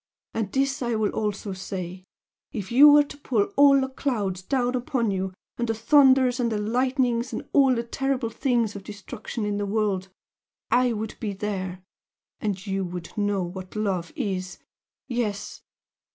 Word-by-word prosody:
And 220 -4 -2
this 275 +2 0
I 240 -2 0
will 215 -1 +1
also 205 -2 -2
say 185 -1 -6 0.5
if 205 -5 -5
you 280 +5 +9
were 295 0 +7
to 290 - -11
pull 225 -7 0
all 280 -1 +7
the 265 - 0
clouds 215 -9 -2
down 245 +4 0
upon 245 -3 0
you 190 0 -2 0.3
and 240 - 0
the 225 - +1
thunders 260 +1 +5
and 235 -2 +1
the 215 - 0
lightnings 245 +2 0
and - - -5
all 270 -3 +5
the 235 - -1
terrible 255 -1 -1
things 235 -5 0
of 200 - -7
destruction 210 +2 -6
in 205 -1 -1
the 205 - -1
world, 200 -3 0 0.6
I 250 0 +4
would 220 -1 -4
be 210 -3 -3
there! 190 -2 -4 0.6
And 200 -2 -3
you 195 -1 -1
would 175 -1 -6
know 205 -2 0
what 185 +2 -7
love 195 -5 -1
is! 190 -6 -3 0.5
Yes!" 235 -6 -3
220 Hz, 165 wpm, -25 LUFS, 195-250 Hz, 0.6 s, you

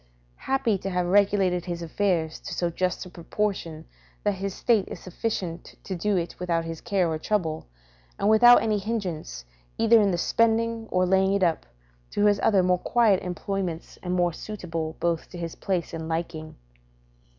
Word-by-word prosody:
Happy 240 -7 +1
to 195 - -4
have 180 -1 0
regulated 190 -2 +2
his 170 -2 -4
affairs 170 -2 -1
to - - -6
so 175 -1 0
just 180 +2 -1
a - - -10
proportion 170 -3 -3 0.4
that 205 - +2
his 195 0 -3
estate 215 +1 +1
is - - -7
sufficient 180 -3 -4
to 190 - -4
do 200 +3 0
it 170 -1 -2
without 170 -2 -1
his 165 -1 -6
care 190 -3 +1
or 160 -1 -2
trouble, 160 - -1 0.5
and 200 - 0
without 240 +3 +7
any 215 -2 +1
hindrance, 185 - -4 0.3
either 225 0 +5
in 200 - +3
the 175 - 0
spending 230 +3 +1
or 185 0 +2
laying 190 +1 +3
it 200 -1 +1
up, 170 -2 +1 0.4
to 205 - +1
his 205 -1 +4
other 195 -4 +4
more 180 0 +2
quiet 225 -4 +3
employments, 180 -1 -4
and 180 0 -2
more 175 -1 +2
suitable 165 -6 -5
both 170 -1 -1
to 180 - -9
his 170 -1 -5
place 180 -4 -2
and 160 0 -5
liking. 160 -1 -4
185 Hz, 175 wpm, -26 LUFS, 170-205 Hz, 0.5 s, without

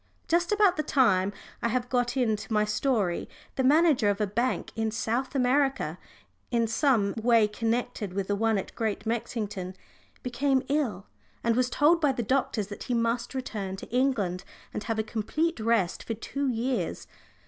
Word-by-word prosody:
Just 345 +2 +2
about 410 -4 +4
the - - +2
time 205 -10 +3 0.3
I - - +1
have 250 +1 -1
got 245 -1 +1
to 255 +1 0
in 220 -3 +2
my 210 -1 +2
story, 210 -5 0 0.3
the 265 - 0
manager 290 -5 +4
of 200 0 0
a 210 - +2
bank 235 +6 -1
in 225 0 0
South 230 +5 -2
America, 270 +1 +1 0.5
in 235 -2 +2
some 225 -4 +2
way 230 -2 +5
connected 225 -1 -2
with 195 0 -1
the 205 - +1
one 220 +1 +2
at 195 - -5
Great 220 -1 -2
Mexington, 210 -5 -3 0.5
became 260 +2 +1
ill, 240 -10 0 0.4
and 230 -1 +2
was 250 0 +2
told 315 +6 +4
by 295 -3 +4
the 240 - -2
doctors 245 -3 0
that 205 +1 -8
he 245 - -1
must 230 +2 -1
return 210 -7 -4
to 195 - -9
England 210 -9 +1 0.3
and 210 - -4
have 225 -1 -1
a 220 - +1
complete 270 +9 -1
rest 220 -5 +1
for 225 - -3
two 275 +5 -3
years. 250 +1 -1
235 Hz, 175 wpm, -28 LUFS, 210-265 Hz, 0.5 s, way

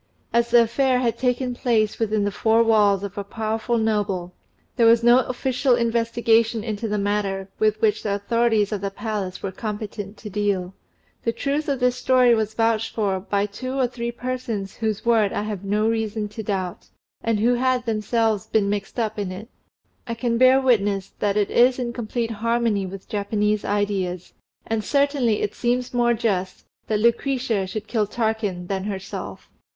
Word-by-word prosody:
As 235 0 +2
the 235 0 +6
affair 255 +3 +1
had 240 -2 0
taken 250 0 0
place 225 -4 0
within 215 -2 +1
the 205 - 0
four 225 +3 +3
walls 205 -3 +3
of 200 +1 -5
a - - -3
powerful 220 +3 -2
noble, 205 -5 -1 0.4
there 235 -3 +4
was 230 0 +5
no 240 +1 +7
official 255 0 +1
investigation 230 -1 +1
into 220 0 -3
the 210 0 -1
matter, 200 -1 -1
with 215 0 +2
which 215 -1 +2
the 200 -2 -1
authorities 220 0 +1
of 205 -3 -2
the 200 - -2
palace 195 -3 -4
were 195 - -2
competent 210 0 -6
to 220 - -9
deal. 200 -3 -1 0.5
The 230 - +1
truth 285 +5 -2
of 275 -2 0
this 250 0 +2
story 250 -1 +4
was 220 -1 -1
vouched 225 -1 0
for 200 -4 0
by 200 +1 -1
two 255 +6 -6
or 260 - +3
three 235 -1 -4
persons 235 -5 -4
whose 220 -2 -2
word 225 -4 +3
I 205 - -1
have 210 -3 -5
no 210 +2 +1
reason 220 -1 -1
to 210 +2 -7
doubt, 190 -4 -3 0.4
and 225 -2 +1
who 235 +3 +3
had 255 0 +1
themselves 220 -1 0
been 205 -2 +1
mixed 205 +2 -4
up 220 -2 -1
in 195 -3 -3
it; 205 +6 -8 0.6
I 230 - -3
can 235 0 -1
bear 255 +1 +6
witness 205 -7 +1
that 205 0 +1
it 205 -1 +1
is 250 +1 +4
in 240 -2 -3
complete 230 0 -3
harmony 225 -2 0
with 190 +1 -9
Japanese 210 0 0
ideas; 195 -3 -2 0.3
and 225 -1 -1
certainly 280 -6 +1
it 205 - -2
seems 245 +1 -1
more 240 -1 +3
just 190 -5 -2 0.2
that 215 -1 0
Lucretia 235 -3 +1
should 215 +3 -5
kill 220 -2 0
Tarquin 220 -5 -2
than 190 +1 -3
herself. 195 -2 -6
220 Hz, 180 wpm, -23 LUFS, 205-235 Hz, 0.6 s, no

